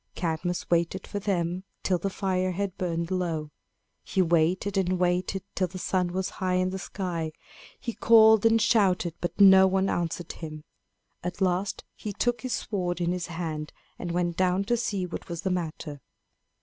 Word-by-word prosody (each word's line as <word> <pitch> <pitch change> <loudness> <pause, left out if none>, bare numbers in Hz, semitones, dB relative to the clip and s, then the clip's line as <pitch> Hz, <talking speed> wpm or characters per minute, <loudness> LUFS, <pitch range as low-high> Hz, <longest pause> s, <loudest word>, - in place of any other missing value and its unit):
Cadmus 170 +1 -2
waited 170 +2 +1
for 205 - -4
them 180 -2 -1 0.2
till 180 -2 +1
the 195 - -1
fire 185 -1 -1
had 195 0 -2
burned 170 -2 -2
low. 165 -5 -2 0.5
He - - -3
waited 175 +3 +2
and 185 -1 +1
waited 180 +1 0
till 185 - 0
the 185 +2 -8
sun 185 0 0
was 185 +1 -2
high 185 -1 +1
in 185 0 +1
the 190 - -4
sky. 170 -5 -4 0.5
He 235 - -4
called 220 -2 +6
and 225 0 +5
shouted, 195 -7 +3
but 175 - -3
no 190 -1 +8
one 190 +1 +1
answered 170 0 -2
him. 155 -2 -8 0.6
At 180 +1 -4
last 190 +1 0
he 210 - -6
took 240 +4 0
his 255 -2 -3
sword 180 -6 -2
in 175 0 +1
his 180 -2 -2
hand 160 -3 -4 0.3
and 175 - -4
went 175 0 0
down 185 +1 +2
to 240 +4 +1
see 205 -5 -1
what 180 +1 -7
was 170 0 -5
the 190 - 0
matter. 155 -4 -4
180 Hz, 175 wpm, -27 LUFS, 170-195 Hz, 0.6 s, no